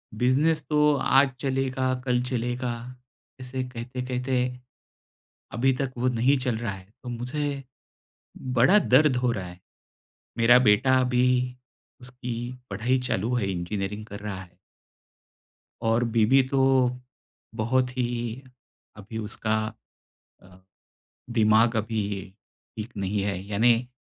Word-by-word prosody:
Business 145 +7 +2
तो 150 -1 +4
आज 135 0 +4
चलेगा, 130 -1 0
कल 125 -1 +2
चलेगा, 125 0 -2 0.7
ऐसे 130 0 -3
कहते-कहते 125 +1 -2 1.1
अभी 130 +3 +2
तक 135 -2 -2
वो 125 +1 +1
नहीं 125 +4 +2
चल 125 -3 -1
रहा 110 -3 -3
है। 95 +1 -13
तो 125 - -6
मुझे 135 +4 -3 0.9
बड़ा 175 - +6
दर्द 145 -4 +4
हो 125 -1 +1
रहा 100 -5 -4
है। 90 0 -12 0.8
मेरा 120 +1 +6
बेटा 130 +3 +4
अभी 125 0 +1 0.5
उसकी 125 -1 -6 0.2
पढ़ाई 120 +7 0
चालू 115 +5 0
है, 100 -5 0
इंजीनियरिंग 95 +4 -4
कर 100 -2 -9
रहा 100 -2 -5
है। 90 -2 -16 1.3
और 115 +1 +2
बीवी 120 +5 +5
तो, 135 -2 +3 0.6
बहुत 125 +3 +1
ही, 120 0 -2 0.5
अभी 105 +2 -8
उसका 110 0 -2 0.9
अ, 90 0 -17 0.7
दिमाग़ 110 0 +4
अभी 110 0 -1 0.8
ठीक 110 +2 -6
नहीं 100 +1 -1
है, 95 -2 -2
यानी 115 +4 +2
125 Hz, 115 wpm, -26 LUFS, 110-130 Hz, 1.3 s, बड़ा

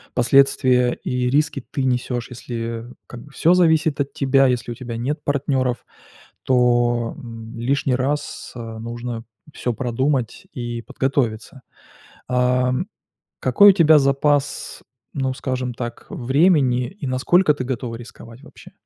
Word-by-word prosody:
последствия 125 0 +4
и 125 0 -1
риски 145 0 0
ты 135 - -2
несешь. 125 -1 -1
Если 115 -1 -5 0.2
как 120 - -10
бы 145 - -16
всё 165 +5 +3
зависит 160 -4 +3
от 140 - -3
тебя, 135 0 +3
если 125 -1 -1
у - - -5
тебя 120 -2 -6
нет 145 +6 -3
партнеров, 135 -3 -1 0.6
то, 120 -2 +2
м, 115 -1 -9
лишний 135 +3 0
раз 140 +4 -3
нужно 115 0 -6 0.3
всё 125 - -2
продумать 125 0 -2
и 120 -1 -5
подготовиться. 130 -1 -2 0.7
А 125 0 +2 0.7
какой 205 0 +6
у - - -1
тебя 160 -4 +6
запас, 140 +1 0 0.3
ну 135 -2 -1
скажем 130 -2 -3
так, 120 0 -6
времени 130 -2 +2
и 190 -4 -9
насколько 150 +6 +3
ты 145 - -5
готова 125 -2 -4
рисковать 115 0 -12
вообще? - - -15
125 Hz, 130 wpm, -21 LUFS, 120-140 Hz, 0.7 s, какой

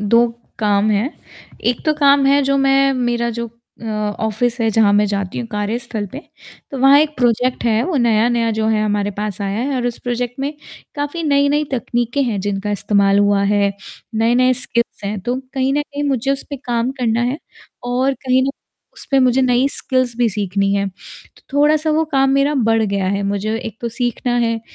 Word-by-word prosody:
2 230 +3 +4 0.3
काम 210 0 +2
हैं। 215 +7 +1 0.6
एक 245 - -4
तो 310 - +4
काम 280 -1 +4
है 280 +1 +4
जो 275 +1 +1
मैं 275 0 +3
मेरा 240 -1 0
जो 235 0 -4 0.4
अ, - - -8
ऑफ़िस 220 +2 -2
है 225 - +2
जहाँ 210 -1 +3
मैं 205 +1 +4
जाती 200 0 -3
हूँ 240 - -4
कार्यस्थल 215 +1 -3
पे, 280 - -6 0.5
तो 270 - -5
वहाँ 270 +2 +7
एक 305 0 +1
प्रोजेक्ट 245 +1 +1
है। 225 -1 +2
वो 345 -4 -1
नया-नया 235 0 +2
जो 220 - +1
है 215 -1 +1
हमारे 205 -1 0
पास 210 -2 -4
आया 200 +1 -2
है 270 +3 -1
और 245 -1 -1
उस 240 - -3
प्रोजेक्ट 245 0 -3
में 280 +2 -2 0.4
काफ़ी 290 +3 -3
नई-नई 285 0 +2
तकनीकें 240 +2 -1
हैं 225 -6 -1
जिनका 205 +1 -3
इस्तेमाल 200 0 +2
हुआ 205 -1 +3
है, 200 0 +2 0.4
नए-नए 240 +3 +3
स्किल्स 235 -3 -2
हैं 205 +1 -3
तो 245 +6 -2 0.2
कहीं 265 0 +1
न 295 +1 +1
कहीं 290 0 -5
मुझे 270 -1 0
उस 275 - -3
पे 280 - -3
काम 240 0 0
करना 235 -1 +1
है 295 - -5 0.5
और 255 +2 0
कहीं 260 -1 +1
ना 270 - 0 0.5
उस - - -6
पे 275 - +4
मुझे 255 0 +3
नई 250 +1 +3
स्किल्स 255 -3 -1
भी 240 -1 +2
सीखनी 195 -1 -1
हैं, 200 0 0
तो 185 - -16
थोड़ा-सा 300 +2 +3
वो 315 +1 +2
काम 270 -1 +3
मेरा 275 +2 +2
बढ़ 225 0 +3
गया 200 -3 -1
है। 200 +1 -1
मुझे 205 +2 -1
एक 225 -1 -7
तो 235 - -2
सीखना 245 +1 -2
है, 230 -1 0
240 Hz, 200 wpm, -18 LUFS, 210-270 Hz, 0.6 s, वहाँ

